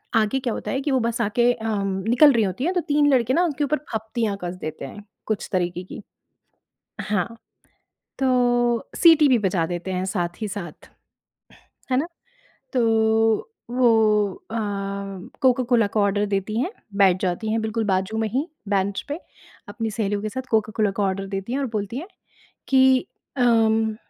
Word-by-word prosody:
आगे 220 +4 +2
क्या 245 -3 -2
होता - - -4
है 270 - 0
कि 285 - -1
वो 260 - +3
बस 235 0 -1
आके 240 +3 +2
अम, 215 -4 -2 0.2
निकल 280 +5 +6
रही 225 -2 +3
होती 190 +7 -2
हैं 360 +3 +1
तो 355 - +1
3 290 0 +3
लड़के 250 0 +2
ना 350 - +3
उनके 300 -3 -1
ऊपर 300 +2 +1
फब्तियाँ 220 -2 -2
कस 175 0 -4
देते 155 -2 -5
हैं, 205 +9 -10 0.2
कुछ 215 -2 -2
तरीके 180 -1 -1
की। 185 - -9 1.0
हाँ। 205 -4 -1 0.9
तो 245 -2 +2
सीटी 320 -4 +6
भी 250 -3 +4
बजा 185 -5 0
देते 175 +2 -4
हैं 185 0 -1
साथ 175 -1 -3
ही 215 - -2
साथ, 175 -6 -8 1.0
है 255 - +3
ना। 295 +5 +1 0.7
तो 255 - +2 0.9
वो 220 -5 +3 0.2
अ, - - -4 0.9
कोका-कोला 245 -4 +3
का 210 - -2
ऑर्डर 205 0 +2
देती 200 +2 -2
हैं, 360 - -2 0.2
बैठ 190 -2 +4
जाती 190 +4 -1
हैं 225 0 0
बिल्कुल 220 +1 -1
बाजू 190 +2 0
में 220 -1 0
ही 270 - -1 0.2
बेंच 195 0 0
पे। 300 +4 -3 0.5
अपनी 225 +1 -3
सहेलियों 205 -1 -1
के 215 - -3
साथ 260 +5 -4
कोका-कोला 215 -2 +1
का 205 - +1
ऑर्डर 195 0 -1
देती 195 +5 -4
हैं 275 - 0
और 275 - 0
बोलती 205 +4 -4
है 340 +7 -6 0.6
कि 260 -1 +4 0.3
अम, 225 -3 +3
220 Hz, 170 wpm, -23 LUFS, 200-250 Hz, 1.0 s, निकल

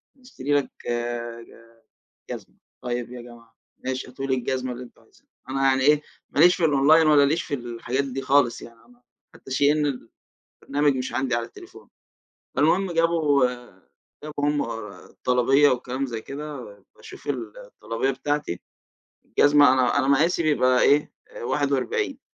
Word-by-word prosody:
نشتري 250 - -5
لك 145 -2 +1 0.2
ج 120 -1 -4 0.8
ج - - -2
جزمة، - - -12 0.3
"طيّب 120 -1 -3
يا 125 - -8
جماعة، 120 -1 -15 0.3
ماشي 130 0 -3
هاتوا 135 +2 -6
لي 130 - +1
الجزمة 130 0 -2
اللي 125 +1 -7
أنتم - - -18
عايزينها" - - -28 0.2
أنا 135 +1 -2
يعني 130 0 +2
إيه 150 +2 +4 0.3
ما 145 - 0
ليش 180 +2 +7
في 175 - 0
الأونلاين 155 +2 +5
والّا 145 -2 +6
ليش 155 +4 +1
في 145 - -4
الحاجات 120 +1 -3
دي 135 0 -5
خالص 135 -4 +2
يعني، 115 -1 -13
أنا 245 0 -24 0.3
حتّى - - -14
SHEIN 145 +3 +3 0.9
البرنامج 145 0 +1
مش 130 0 -4
عندي 130 -3 0
على 120 -1 -2
التليفون. - - -15 0.7
فالمهم 175 +6 +2
جابوا 165 -5 +3 0.8
جابوا 150 -1 -4
هم 145 0 +1 0.5
الطلبية 135 +3 +3
وكلام 130 +2 -2
زي 115 -3 -5
كده 145 +4 -7 0.4
باشوف - - -13
ال - - -4
الطلبية 135 - -3
بتاعتي 135 -7 -3 0.7
الجزمة 145 -2 +5
أنا 130 -2 +2
أنا 135 - +1
مقاسي 160 +5 +3
بيبقى 130 -4 +3
إيه 145 +1 +3 0.3
41 445 - -1
135 Hz, 150 wpm, -24 LUFS, 125-150 Hz, 0.9 s, ليش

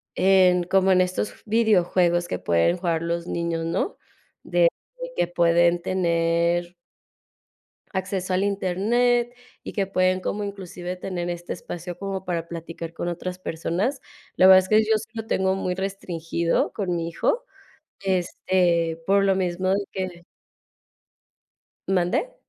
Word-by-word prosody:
en 185 -2 +4
como 190 +1 +3
en 185 0 +5
estos 185 +3 -1
videojuegos 180 -6 +2
que - - -3
pueden 85 - +2
jugar 170 -2 -1
los 170 +1 -2
niños, 170 -1 -2
¿no? 175 - -2 0.5
De 175 -1 +3 0.5
que - - +2
pueden 170 0 +3
tener 170 -1 +1 1.2
acceso 190 -1 -2
al 185 +2 +2
Internet 235 +6 +1 0.3
y - - -7
que 195 -3 0
pueden 185 -1 +2
como 210 +2 -2
inclusive 185 -2 -6
tener 180 -1 -4
este 175 0 -5
espacio 175 0 -7
como 195 -1 -4
para 170 -3 -3
platicar 165 0 -7
con 175 - -4
otras 180 +1 -4
personas. 185 - -2 0.4
La 185 - +5
verdad 190 0 +9
es 185 - -4
que 215 0 +6
yo 220 0 +2
sí 215 - -9
lo 225 -1 -5
tengo 190 -3 +1
muy 185 -1 -2
restringido 170 -3 -1
con 185 -4 -2
mi 165 0 -2
hijo, - - -1 0.6
este, 175 -3 +1
por 195 0 +4
lo 195 -1 +3
mismo 185 0 -1
de 200 +1 +1
que 185 -2 -5 1.6
¿Mande? 190 - 0
180 Hz, 140 wpm, -24 LUFS, 170-195 Hz, 1.6 s, verdad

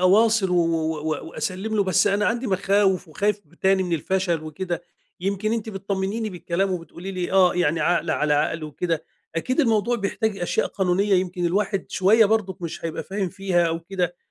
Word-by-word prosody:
أواصل 205 +2 +4
و - - +2
و 165 -2 +1
و 155 +1 -3
وأسلّم 195 +6 -3
له، 200 - +4
بس 185 0 +3
أنا 205 +1 +2
عندي 240 +3 0
مخاوف 195 -2 +2
وخايف 205 +6 0
ب 155 - -24
تاني 190 +2 +2
من 180 -2 -3
الفشل 170 0 0
وكده، 175 +3 -4 0.4
يمكن 200 +3 -1
أنتِ 225 -1 -2
بتطمنيني 200 +2 -2
بالكلام 180 +2 -1
وبتقولي 175 +1 -5
لي: 180 -1 -3
"آه" 185 -2 +5
يعني 175 -1 +1
عقل 175 -1 +1
على 150 -1 +2
عقل 155 +2 0
وكده، 160 +1 -2 0.3
أكيد 255 - +1
الموضوع 235 -2 +2
بيحتاج 205 0 -1
أشياء 175 - 0
قانونية 195 +1 +1
يمكن 180 -1 0
الواحد 195 +2 0
شوَية 215 +4 +5
برضُك 200 -3 0
مش 165 -1 -5
هيبقى 165 -1 -3
فاهم 195 -1 -2
فيها 175 -2 +1
أو 165 0 -2
كده، 175 0 -2
190 Hz, 180 wpm, -24 LUFS, 170-200 Hz, 0.4 s, آه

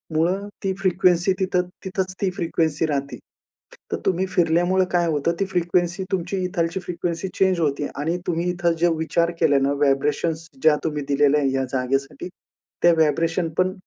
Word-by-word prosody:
मूळं 185 +6 +1 0.2
ती 190 -1 0
फ्रिक्वेन्सी 185 -1 +2
तिथं 180 -1 0 0.2
तिथंच 185 0 -2
ती 195 - +2
फ्रिक्वेन्सी 160 -2 0
राहते. 140 -2 -2 0.7
तर - - 0
तुम्ही 185 0 +1
फिरल्यामुळं 175 +1 +2
काय 175 -1 +2
होतं, 155 +1 +1
ती 195 - +1
फ्रिक्वेन्सी 175 0 0
तुमची 185 +1 -1
इकडची 170 0 -1
फ्रिक्वेन्सी 175 0 -3
चेंज 190 -2 +2
होते 145 -2 0
आणि 160 +5 -1
तुम्ही 175 +1 0
इथं 175 -1 +1
जे 175 - +4
विचार 170 +2 0
केले 145 -4 +4
ना, 135 +1 +1
व्हायब्रेशनस 150 +3 0
ज्या 155 -1 +5
तुम्ही 150 -2 -2
दिलेल्या 145 +1 +3
या 135 0 0
जागेसाठी, 135 +3 -2 0.5
त्या 175 0 +6
व्हायब्रेशन 165 +2 +1
पण 185 0 +2
170 Hz, 155 wpm, -23 LUFS, 150-180 Hz, 0.7 s, त्या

